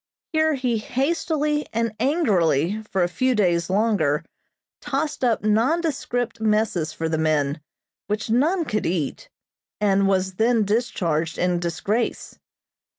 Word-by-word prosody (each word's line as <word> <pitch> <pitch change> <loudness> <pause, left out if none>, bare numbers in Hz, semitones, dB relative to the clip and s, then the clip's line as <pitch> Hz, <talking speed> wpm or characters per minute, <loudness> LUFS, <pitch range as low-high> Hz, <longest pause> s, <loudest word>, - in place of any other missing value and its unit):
Here 315 -1 +3
he 250 -4 0
hastily 300 +4 -1
and 230 0 0
angrily 205 - +2
for 190 -2 +1
a - - +2
few 255 +8 0
days 175 -5 +1
longer 185 -8 +1 0.6
tossed 290 0 -2
up 230 -4 +2
nondescript 245 0 0
messes 210 -7 +1
for 165 - -3
the 160 -1 -1
men, 150 -1 0 0.5
which 210 +1 -2
none 310 +10 +2
could 215 -6 -1
eat, 165 -5 -3 0.5
and 200 -1 +3
was 190 -1 +1
then 230 -2 +3
discharged 170 -8 -1
in 180 -1 +1
disgrace. 185 +7 -2
215 Hz, 125 wpm, -23 LUFS, 175-250 Hz, 0.6 s, Here